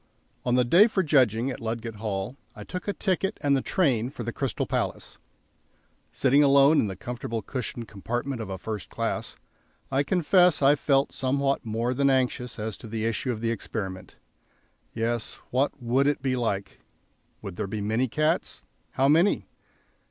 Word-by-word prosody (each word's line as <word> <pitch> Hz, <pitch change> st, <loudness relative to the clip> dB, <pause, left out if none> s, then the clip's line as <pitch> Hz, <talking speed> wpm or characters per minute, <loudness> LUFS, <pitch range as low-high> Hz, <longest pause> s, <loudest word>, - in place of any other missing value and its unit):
On 125 Hz, -1 st, +2 dB
the 125 Hz, -1 st, +3 dB
day 175 Hz, -, +6 dB
for 195 Hz, -4 st, 0 dB
judging, 130 Hz, -, +3 dB
at -, -, -6 dB
Ludgate 115 Hz, -1 st, -4 dB
Hill 100 Hz, +2 st, -3 dB, 0.2 s
I -, -, -8 dB
took 180 Hz, +2 st, -6 dB
a 205 Hz, -, 0 dB
ticket 195 Hz, +1 st, -1 dB
and 140 Hz, -1 st, +3 dB
the 135 Hz, -, +1 dB
train 130 Hz, -11 st, +1 dB
for 130 Hz, -3 st, -7 dB
the 120 Hz, +1 st, -4 dB
Crystal 135 Hz, -5 st, -2 dB
Palace. -, -, -3 dB, 0.9 s
Sitting 140 Hz, +2 st, +3 dB
alone 140 Hz, +2 st, +6 dB
in -, -, +2 dB
the 95 Hz, -, -5 dB
comfortable 115 Hz, +1 st, -5 dB
cushioned 120 Hz, -2 st, -5 dB
compartment 120 Hz, +5 st, -4 dB
of 105 Hz, -, -6 dB
a 95 Hz, -, -4 dB
"first 105 Hz, +1 st, -6 dB
class," -, -, -3 dB, 0.6 s
I 135 Hz, +1 st, +3 dB
confess 180 Hz, +1 st, +3 dB
I 140 Hz, 0 st, +6 dB
felt 140 Hz, -1 st, +2 dB
somewhat 135 Hz, +1 st, 0 dB
more 115 Hz, +3 st, -1 dB
than 140 Hz, +2 st, +2 dB
anxious 125 Hz, -2 st, 0 dB
as 110 Hz, -1 st, -4 dB
to -, -, -10 dB
the 110 Hz, 0 st, -3 dB
issue 115 Hz, +3 st, -1 dB
of 110 Hz, -2 st, -5 dB
the 115 Hz, 0 st, 0 dB
experiment. 95 Hz, -4 st, -5 dB, 0.8 s
Yes; 115 Hz, 0 st, -2 dB, 0.2 s
what 135 Hz, +3 st, 0 dB
would 125 Hz, +3 st, +2 dB
it 145 Hz, -3 st, 0 dB
be 130 Hz, -2 st, +1 dB
like? 100 Hz, -5 st, -2 dB, 0.6 s
Would 95 Hz, -3 st, -6 dB
there -, -, -2 dB
be 105 Hz, +2 st, -4 dB
many 110 Hz, +5 st, 0 dB
cats? 155 Hz, +6 st, -1 dB, 0.3 s
How 135 Hz, -, +2 dB
many? 165 Hz, +7 st, +3 dB
125 Hz, 175 wpm, -26 LUFS, 110-140 Hz, 0.9 s, day